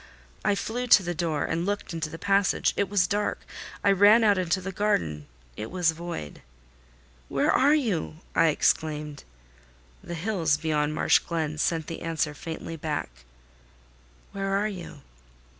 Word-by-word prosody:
I 205 Hz, -, +2 dB
flew 245 Hz, +5 st, -3 dB
to 205 Hz, -4 st, +7 dB
the 175 Hz, 0 st, -2 dB
door 160 Hz, -3 st, -1 dB
and 165 Hz, +1 st, -1 dB
looked 205 Hz, -1 st, -3 dB
into 165 Hz, -1 st, -3 dB
the 165 Hz, -, -8 dB
passage: 195 Hz, +2 st, +2 dB
it 200 Hz, -2 st, 0 dB
was 200 Hz, -3 st, +3 dB
dark. 205 Hz, +2 st, -1 dB, 0.4 s
I 200 Hz, -, +5 dB
ran 205 Hz, +4 st, +6 dB
out 205 Hz, -3 st, +4 dB
into 180 Hz, +1 st, 0 dB
the 190 Hz, +1 st, -5 dB
garden: 85 Hz, -, -1 dB, 0.3 s
it 110 Hz, -, -6 dB
was 175 Hz, -3 st, +2 dB
void. 160 Hz, -, -7 dB, 0.9 s
"Where -, -, +2 dB
are 285 Hz, +3 st, +4 dB
you?" 215 Hz, -, -1 dB, 0.2 s
I 165 Hz, -, +4 dB
exclaimed. 150 Hz, -1 st, 0 dB, 0.8 s
The 170 Hz, -, -6 dB
hills 165 Hz, -4 st, 0 dB
beyond 155 Hz, -1 st, 0 dB
Marsh -, -, +4 dB
Glen 155 Hz, -3 st, -3 dB
sent 165 Hz, -1 st, 0 dB
the 165 Hz, -, -7 dB
answer 160 Hz, -2 st, -1 dB
faintly 165 Hz, +2 st, -7 dB
back—"Where -, -, -7 dB
are 210 Hz, +1 st, +1 dB
you?" 175 Hz, -8 st, -8 dB
165 Hz, 150 wpm, -26 LUFS, 150-195 Hz, 0.9 s, to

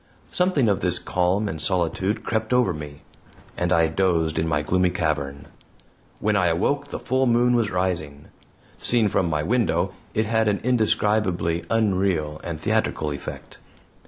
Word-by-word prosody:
Something 180 Hz, -9 st, +2 dB
of 100 Hz, -3 st, +2 dB
this -, -, +2 dB
calm 90 Hz, +4 st, 0 dB
and 80 Hz, -5 st, -5 dB
solitude 95 Hz, +4 st, -1 dB
crept 110 Hz, +1 st, -1 dB
over 125 Hz, -7 st, +3 dB
me, 75 Hz, -2 st, -9 dB, 0.5 s
and 90 Hz, 0 st, -1 dB
I 85 Hz, -2 st, +4 dB
dozed 80 Hz, -2 st, 0 dB
in 80 Hz, -, 0 dB
my 75 Hz, -2 st, 0 dB
gloomy 90 Hz, +3 st, +2 dB
cavern. 75 Hz, -5 st, -2 dB, 0.7 s
When 105 Hz, 0 st, +1 dB
I 90 Hz, -3 st, +3 dB
awoke 140 Hz, +13 st, 0 dB
the -, -, -5 dB
full 130 Hz, +1 st, 0 dB
moon 120 Hz, +1 st, +3 dB
was 115 Hz, -3 st, +2 dB
rising. 85 Hz, -6 st, -2 dB, 0.5 s
Seen 115 Hz, -3 st, +2 dB
from 90 Hz, -2 st, +1 dB
my 75 Hz, -1 st, -1 dB
window, 95 Hz, -5 st, +1 dB, 0.2 s
it 110 Hz, -, +1 dB
had 110 Hz, 0 st, +1 dB
an 100 Hz, -1 st, +1 dB
indescribably 105 Hz, -8 st, +1 dB
unreal 95 Hz, -8 st, 0 dB
and 85 Hz, -3 st, -5 dB
theatrical 75 Hz, 0 st, 0 dB
effect. 70 Hz, -, -8 dB
95 Hz, 155 wpm, -23 LUFS, 80-110 Hz, 0.7 s, I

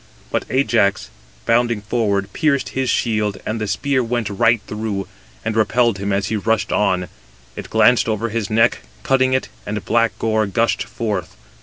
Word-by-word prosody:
But -, -, -1 dB
Ajax, 115 Hz, -, +1 dB, 0.3 s
bounding 120 Hz, -2 st, +2 dB
forward, 100 Hz, -3 st, -1 dB
pierced 140 Hz, -3 st, +1 dB
his 130 Hz, -1 st, -2 dB
shield: 105 Hz, -5 st, 0 dB
and 110 Hz, 0 st, -3 dB
the 105 Hz, -, -1 dB
spear 130 Hz, +7 st, 0 dB
went 115 Hz, -3 st, -2 dB
right 115 Hz, +4 st, +3 dB
through, 105 Hz, -2 st, -4 dB, 0.4 s
and 110 Hz, 0 st, -1 dB
repelled 115 Hz, -1 st, +2 dB
him 100 Hz, +1 st, -2 dB
as 95 Hz, -1 st, 0 dB
he 110 Hz, -, 0 dB
rushed 105 Hz, 0 st, 0 dB
on: 95 Hz, -3 st, +1 dB, 0.5 s
it -, -, -8 dB
glanced 125 Hz, -2 st, +4 dB
over 110 Hz, +2 st, -1 dB
his 110 Hz, -2 st, -2 dB
neck, 115 Hz, +1 st, +3 dB, 0.2 s
cutting 130 Hz, -1 st, +2 dB
it, 130 Hz, -, 0 dB
and 105 Hz, -2 st, -4 dB
black 115 Hz, -3 st, +1 dB
gore 110 Hz, -2 st, +1 dB
gushed 115 Hz, +4 st, 0 dB
forth. 105 Hz, -6 st, -4 dB
110 Hz, 165 wpm, -20 LUFS, 100-120 Hz, 0.5 s, glanced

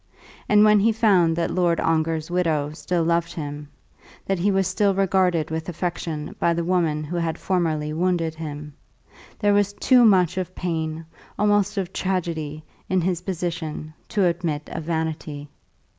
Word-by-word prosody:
And 210 Hz, 0 st, +6 dB
when 210 Hz, -1 st, +6 dB
he 225 Hz, +3 st, +4 dB
found 195 Hz, -7 st, +3 dB
that 170 Hz, 0 st, -1 dB
Lord 175 Hz, -2 st, +1 dB
Ongar's 160 Hz, 0 st, 0 dB
widow 160 Hz, -5 st, 0 dB
still 170 Hz, +2 st, -1 dB
loved 170 Hz, 0 st, 0 dB
him, 145 Hz, -2 st, -6 dB, 0.6 s
that 195 Hz, -2 st, -1 dB
he 195 Hz, +4 st, +2 dB
was 195 Hz, -1 st, +2 dB
still 195 Hz, +1 st, +1 dB
regarded 185 Hz, -5 st, +1 dB
with 160 Hz, +1 st, -3 dB
affection 170 Hz, -3 st, -4 dB
by 170 Hz, -, +2 dB
the 170 Hz, -, -1 dB
woman 165 Hz, -4 st, +1 dB
who 175 Hz, +4 st, -4 dB
had 165 Hz, -1 st, -1 dB
formerly 160 Hz, -5 st, -1 dB
wounded 170 Hz, -1 st, 0 dB
him, 150 Hz, -2 st, -7 dB, 0.6 s
there 205 Hz, -2 st, +2 dB
was 205 Hz, 0 st, +2 dB
too 250 Hz, +3 st, +4 dB
much 185 Hz, -4 st, +4 dB
of 185 Hz, 0 st, -5 dB
pain, 160 Hz, -2 st, -3 dB, 0.3 s
almost 205 Hz, 0 st, +2 dB
of 190 Hz, -1 st, -2 dB
tragedy, 160 Hz, -5 st, -2 dB, 0.3 s
in 185 Hz, -, +2 dB
his 175 Hz, 0 st, -1 dB
position, 170 Hz, -4 st, -4 dB, 0.2 s
to 200 Hz, -3 st, +2 dB
admit 165 Hz, -4 st, -1 dB
of 155 Hz, -, -5 dB
vanity. 160 Hz, -3 st, -3 dB
170 Hz, 160 wpm, -23 LUFS, 160-185 Hz, 0.6 s, And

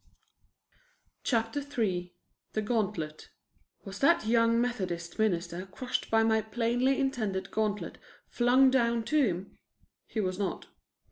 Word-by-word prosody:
CHAPTER 225 Hz, +2 st, 0 dB
III 215 Hz, -11 st, -2 dB, 0.4 s
THE 215 Hz, -, 0 dB
GAUNTLET 205 Hz, -9 st, -2 dB, 0.6 s
Was 195 Hz, 0 st, -7 dB
that 335 Hz, -3 st, +4 dB
young 230 Hz, +1 st, +3 dB
Methodist 185 Hz, -8 st, -3 dB
minister 180 Hz, -3 st, 0 dB
crushed 250 Hz, +6 st, -3 dB
by 225 Hz, 0 st, +4 dB
my 220 Hz, 0 st, +3 dB
plainly 240 Hz, +5 st, +1 dB
intended 220 Hz, -8 st, -1 dB
gauntlet 210 Hz, -1 st, -2 dB, 0.3 s
flung 255 Hz, +2 st, +4 dB
down 235 Hz, -3 st, +2 dB
to 305 Hz, +4 st, +2 dB
him? 190 Hz, -4 st, -3 dB, 0.5 s
He 225 Hz, -, -4 dB
was 185 Hz, -2 st, -1 dB
not. 200 Hz, -, -2 dB
225 Hz, 120 wpm, -30 LUFS, 190-245 Hz, 0.6 s, that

